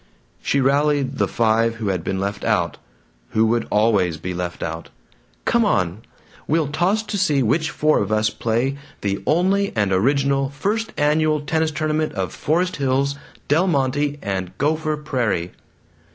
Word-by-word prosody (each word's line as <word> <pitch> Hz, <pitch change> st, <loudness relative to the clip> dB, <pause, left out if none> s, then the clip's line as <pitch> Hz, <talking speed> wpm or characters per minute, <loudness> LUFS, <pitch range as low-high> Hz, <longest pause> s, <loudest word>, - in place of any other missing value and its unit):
She 140 Hz, -, +1 dB
rallied 140 Hz, 0 st, +1 dB
the -, -, +3 dB
five 115 Hz, 0 st, +2 dB
who 110 Hz, -3 st, -3 dB
had 90 Hz, -3 st, -1 dB
been 95 Hz, +2 st, -2 dB
left 100 Hz, +1 st, -3 dB
out, -, -, 0 dB, 0.6 s
who 110 Hz, +1 st, +4 dB
would 115 Hz, +1 st, +1 dB
always 105 Hz, -6 st, +2 dB
be 90 Hz, +3 st, -5 dB
left 90 Hz, 0 st, -4 dB
out. 80 Hz, 0 st, -5 dB, 0.6 s
"Come 235 Hz, 0 st, +3 dB
on! 90 Hz, -, 0 dB, 0.5 s
We'll 155 Hz, -1 st, +1 dB
toss 180 Hz, +8 st, +1 dB
to 205 Hz, -2 st, -3 dB
see 150 Hz, -8 st, +2 dB
which 155 Hz, +8 st, +1 dB
four 155 Hz, -1 st, +2 dB
of 100 Hz, +1 st, -2 dB
us 110 Hz, 0 st, +2 dB
play 120 Hz, +5 st, -1 dB, 0.2 s
the 100 Hz, -1 st, -1 dB
Only 195 Hz, +5 st, +2 dB
and 100 Hz, -3 st, +1 dB
Original 135 Hz, +6 st, +2 dB
First 210 Hz, +10 st, -2 dB
Annual 155 Hz, 0 st, +2 dB
Tennis 160 Hz, +2 st, 0 dB
Tournament 155 Hz, 0 st, -1 dB
of 95 Hz, -2 st, -3 dB
Forest 180 Hz, +4 st, 0 dB
Hills, 140 Hz, 0 st, +1 dB, 0.3 s
Del 165 Hz, +6 st, +3 dB
Monte, 145 Hz, -1 st, 0 dB
and 95 Hz, -3 st, -3 dB
Gopher 155 Hz, +1 st, 0 dB
Prairie!" 120 Hz, -, -1 dB
140 Hz, 155 wpm, -21 LUFS, 105-155 Hz, 0.6 s, who